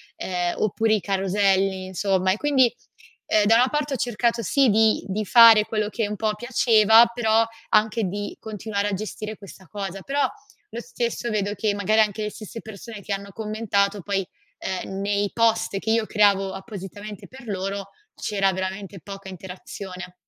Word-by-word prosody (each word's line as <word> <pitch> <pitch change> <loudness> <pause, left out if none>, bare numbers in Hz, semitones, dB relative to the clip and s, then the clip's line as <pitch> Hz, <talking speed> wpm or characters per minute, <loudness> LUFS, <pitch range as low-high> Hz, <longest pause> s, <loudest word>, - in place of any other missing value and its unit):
ehm, 180 -1 -2
oppure 220 +1 +1
i 210 - -2
caroselli, 195 0 +1
insomma. 185 0 0
E 195 - 0
quindi, 265 -3 +3 0.5
ehm, 210 -1 +3
da 225 +2 +5
una 250 +2 +4
parte 295 0 -1
ho - - -1
cercato 235 0 0
sì, 265 +5 +3
di 220 +1 +3
di 205 +2 -2
fare 225 0 +8
quello 215 -1 -2
che 220 -1 -2
un 210 - -4
po' 215 0 -1
piaceva, 225 -1 +5
però 225 -2 +3 0.3
anche 215 +1 +2
di 205 +3 -5
continuare 210 -1 -3
a 205 - -2
gestire 215 +1 -6
questa 190 -2 -14
cosa, 195 0 -6
però 280 +6 0 0.4
lo 230 - -5
stesso 240 0 -3
vedo 205 -2 -1
che 210 0 -1
magari 205 +2 +1
anche 215 0 0
le 210 - -3
stesse 215 +2 -9
persone 220 0 -10
che 200 - -4
hanno 200 0 -5
commentato 210 -2 -1
poi, 195 +1 -2 0.3
ehm, 190 +1 -4
nei 200 0 0
post 225 -3 +1
che 220 +3 -2
io 225 -1 +1
creavo 200 -2 +3
appositamente 205 0 -8
per 260 -1 -13
loro, 195 0 -4 0.2
c'era 195 -2 0
veramente 190 +1 -5
poca 195 0 -9
interazione. 185 0 -9
210 Hz, 170 wpm, -24 LUFS, 195-220 Hz, 0.5 s, fare